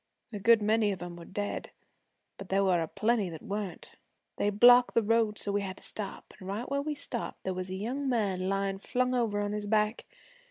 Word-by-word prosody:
A 205 - -4
good 225 +1 +5
many 215 0 +3
of 185 -2 -5
'em 175 -1 -7
were 170 -1 -10
dead, 205 +1 -4 0.7
but 195 - -9
there 195 +1 +2
were 180 -3 +3
a 165 - -2
plenty 215 0 0
that 160 -2 -9
weren't. 205 -3 -5 0.5
They 205 - +1
blocked 245 +4 +6
the 230 - +4
road 220 -1 +2
so 200 - -1
we 205 0 0
had 190 -2 -5
to - - -12
stop, 205 -2 -6
an' 185 - -8
right 205 +5 -3
where 280 0 -1
we 300 +1 -3
stopped 250 -4 -5
there 190 - -2
was 185 0 -4
a 185 - -4
young 255 +8 -2
man 195 -6 0
layin' 195 0 -1
flung 250 +4 0
over 230 -5 +1
on 205 0 -1
his 210 0 -3
back. 215 +1 +1
205 Hz, 225 wpm, -30 LUFS, 195-230 Hz, 0.7 s, blocked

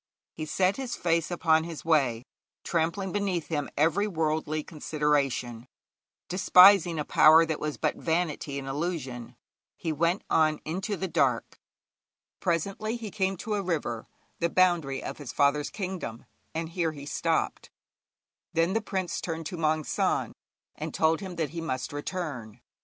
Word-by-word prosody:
He 155 -1 -5
set 185 +5 +1
his 265 -3 -3
face 165 -2 0
upon 160 -2 +3
his 165 -1 -7
way, 135 -8 +2 0.4
trampling 175 +3 -1
beneath 195 -5 -1
him 150 -3 -2
every 170 +8 +3
worldly 155 -3 -1
consideration, 145 -7 -1 0.6
despising 180 -1 +6
a 150 - -2
power 160 +2 +7
that 160 -2 -3
was 150 -1 -3
but - - -1
vanity 160 -4 -1
and 135 -1 -5
illusion; 135 -6 -4 0.4
he 165 - -2
went 170 +5 +1
on 155 -1 +3
into 190 +5 -3
the 190 - -2
dark. 135 -8 0 0.8
Presently 200 +7 -1
he 220 -3 -7
came 190 -1 0
to 215 +4 -4
a 205 - 0
river, 150 -11 -2 0.3
the 170 - +1
boundary 170 -7 +2
of - - -6
his 140 -4 -6
father's 145 +1 +2
kingdom, 180 - -5 0.3
and 165 0 -2
here 165 -2 -1
he 140 -2 -9
stopped. - - -1 0.8
Then 165 +3 +2
the 225 - +1
prince 190 -3 -3
turned 165 -1 -4
to 180 - -4
Maung 155 -1 +1
San, - - 0 0.4
and - - -6
told 160 0 +3
him 190 -2 -7
that 160 -4 -2
he 165 0 -5
must 130 -4 -3
return. 145 - -5
160 Hz, 150 wpm, -28 LUFS, 150-180 Hz, 0.8 s, power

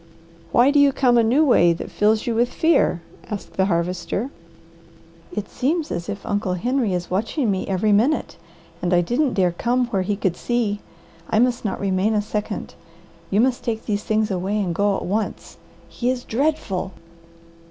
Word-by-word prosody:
"Why 250 +4 +5
do 290 - +4
you 285 -1 +6
come 255 -2 +3
a 235 - +5
new 260 +8 +3
way 175 - +5
that 165 - -7
fills 215 +2 +2
you 240 - 0
with 240 +2 +1
fear?" 320 - +2 0.3
asked 210 -2 -6
the 190 - +2
Harvester. 180 +7 -1 1.0
"It 210 -2 -4
seems 300 +5 -1
as 170 0 -4
if 200 - -5
Uncle 205 -3 -1
Henry 235 0 0
is 175 0 -4
watching 225 - 0
me 190 -1 -2
every 195 +2 +1
minute, 235 +10 +2 0.5
and 175 0 +1
I 175 - +4
didn't 250 - 0
dare 185 -2 +3
come 245 +8 0
where 195 -5 0
he 200 +2 -1
could 190 -3 -1
see. 220 -1 -1 0.5
I 220 - +1
must 240 +1 +2
not 205 - -2
remain 200 +2 +1
a 210 - +2
second. 210 0 -4 0.6
You 200 +3 +3
must 250 0 +1
take 225 -2 -3
these 210 -1 -1
things 215 -1 0
away 190 +3 -1
and 185 -4 -1
go 200 +2 +1
at - - -5
once. 210 +4 -3 0.3
He 245 - -2
is 255 -1 -1
dreadful." 225 -8 -1
215 Hz, 185 wpm, -22 LUFS, 190-245 Hz, 1.0 s, you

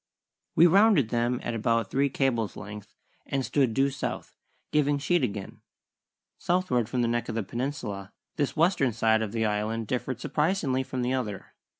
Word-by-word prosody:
We 165 - +7
rounded 190 - +5
them 120 +1 0
at 120 - -2
about 115 -1 0
three 140 +1 +2
cables' 125 -6 0
length 105 0 -9 0.3
and 135 -2 -1
stood 130 -6 +1
due 135 +1 +3
south, 135 - -5 0.4
giving 145 -1 +2
sheet 145 +3 +1
again. 100 -4 -4 0.8
Southward 170 -11 +1
from 125 -2 0
the - - +2
neck 120 0 -1
of - - -3
the 115 - -1
peninsula 105 -5 -4 0.2
this 145 +1 -1
western 160 - +3
side 110 0 +2
of 110 -2 -2
the 110 0 0
Island 110 +2 -1
differed 125 +2 -3
surprisingly 150 -3 0
from 130 -1 -3
the 125 +1 0
other. 110 -7 -4
125 Hz, 170 wpm, -27 LUFS, 110-140 Hz, 0.8 s, We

